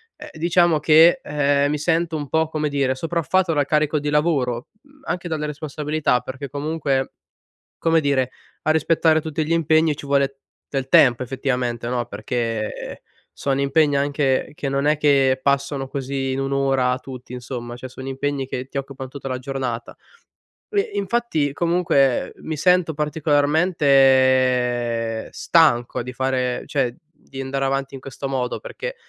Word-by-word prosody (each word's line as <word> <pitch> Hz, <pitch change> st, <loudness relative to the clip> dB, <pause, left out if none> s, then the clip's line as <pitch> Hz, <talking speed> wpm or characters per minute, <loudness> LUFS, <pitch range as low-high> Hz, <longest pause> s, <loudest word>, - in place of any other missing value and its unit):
ehm, -, -, -11 dB
diciamo 170 Hz, 0 st, +2 dB
che, 160 Hz, -, +6 dB
ehm, 145 Hz, -1 st, +1 dB
mi 150 Hz, -, 0 dB
sento 165 Hz, +2 st, 0 dB
un 145 Hz, -3 st, -4 dB
po', 160 Hz, +3 st, +1 dB
come 155 Hz, -1 st, -2 dB
dire, 140 Hz, -2 st, 0 dB
sopraffatto 170 Hz, +4 st, 0 dB
dal 145 Hz, -2 st, +1 dB
carico 150 Hz, +1 st, +1 dB
di 145 Hz, +1 st, -3 dB
lavoro, 140 Hz, -6 st, 0 dB, 0.2 s
mhmm, 285 Hz, +1 st, -23 dB
anche 180 Hz, -1 st, -3 dB
dalle 155 Hz, -2 st, -2 dB
responsabilità, 150 Hz, -2 st, -1 dB
perché 130 Hz, +3 st, -7 dB
comunque, 145 Hz, -2 st, -2 dB, 0.6 s
come 165 Hz, 0 st, +3 dB
dire, 135 Hz, -4 st, +1 dB, 0.3 s
a 155 Hz, -, 0 dB
rispettare 160 Hz, 0 st, +3 dB
tutti 155 Hz, 0 st, -3 dB
gli 155 Hz, -, -6 dB
impegni, 160 Hz, -1 st, +3 dB
ci 145 Hz, -, -9 dB
vuole 140 Hz, -1 st, +1 dB, 0.3 s
del 135 Hz, -2 st, -2 dB
tempo 125 Hz, -2 st, +5 dB
effettivamente, 125 Hz, -2 st, -2 dB
no, 120 Hz, -1 st, -1 dB
perché, 115 Hz, 0 st, -3 dB
ehm, -, -, -7 dB, 0.4 s
sono 135 Hz, -1 st, -1 dB
impegni, 140 Hz, +1 st, +2 dB
anche, 140 Hz, -1 st, 0 dB
che 145 Hz, -5 st, -3 dB
non 140 Hz, +1 st, 0 dB
è 150 Hz, +1 st, +3 dB
che 140 Hz, -3 st, +3 dB
passano 140 Hz, 0 st, 0 dB
così 135 Hz, 0 st, -3 dB
in 135 Hz, -, -2 dB
1 135 Hz, 0 st, -2 dB
ora 135 Hz, -2 st, +1 dB
tutti, 130 Hz, -1 st, -10 dB
insomma, 120 Hz, -1 st, -6 dB
cioè 130 Hz, +1 st, -8 dB
sono 130 Hz, +1 st, -8 dB
impegni 135 Hz, 0 st, -2 dB
che 130 Hz, -1 st, -4 dB
ti 140 Hz, -, -4 dB
occupan 135 Hz, -1 st, -6 dB
tutta 135 Hz, 0 st, -7 dB
la 130 Hz, -1 st, -3 dB
giornata. 130 Hz, -3 st, -4 dB, 0.7 s
E, 415 Hz, +1 st, 0 dB
Infatti, 200 Hz, -8 st, 0 dB
comunque, 165 Hz, -5 st, +1 dB
mi 160 Hz, -, -5 dB
sento 180 Hz, +1 st, +3 dB
particolarmente 130 Hz, -6 st, +2 dB
stanco 145 Hz, -10 st, +3 dB
di 125 Hz, +2 st, -7 dB
fare 130 Hz, -1 st, -1 dB
cioè, 130 Hz, -4 st, -1 dB, 0.2 s
di 135 Hz, -4 st, -10 dB
andare 135 Hz, +1 st, -2 dB
avanti 135 Hz, 0 st, -2 dB
in -, -, -7 dB
questo 135 Hz, +1 st, -6 dB
modo 130 Hz, -2 st, -2 dB
perché, -, -, -6 dB
140 Hz, 155 wpm, -22 LUFS, 130-155 Hz, 0.7 s, che